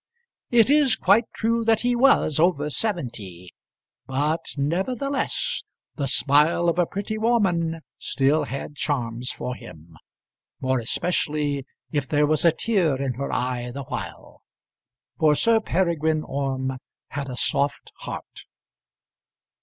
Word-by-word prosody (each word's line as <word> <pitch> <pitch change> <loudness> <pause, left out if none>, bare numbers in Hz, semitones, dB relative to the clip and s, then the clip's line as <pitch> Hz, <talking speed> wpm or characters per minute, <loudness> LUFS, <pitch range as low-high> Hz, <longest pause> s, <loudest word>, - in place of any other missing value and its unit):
It 240 +2 +4
is 290 -5 +5
quite 205 +5 +4
true 230 +1 0
that 225 -1 +3
he 245 0 +1
was 240 - +4
over 155 -3 +2
seventy; 115 - -3 0.5
but 150 +5 0 0.2
nevertheless 255 - -1 0.3
the 140 -2 -2
smile 150 +6 +3
of 170 - 0
a 175 - +3
pretty 210 +2 -4
woman 175 -8 +1 0.2
still 145 +3 +1
had 140 +2 -6
charms 125 -5 -2
for 125 +1 -4
him, 85 -8 -13 0.6
more 130 -1 0
especially 145 +1 -1 0.2
if 145 -3 -1
there 150 +1 +3
was 155 0 +3
a 170 - +6
tear 170 -7 +1
in 135 -2 -1
her 140 +3 -4
eye 125 -1 -2
the 140 +3 -6
while; - - -7 0.8
for 155 -1 +4
Sir 230 +6 +4
Peregrine 160 -6 0
Orme 130 -1 -3 0.3
had 140 -1 -4
a 125 - -5
soft 140 +3 -1
heart. - - -8
150 Hz, 130 wpm, -24 LUFS, 135-195 Hz, 0.8 s, a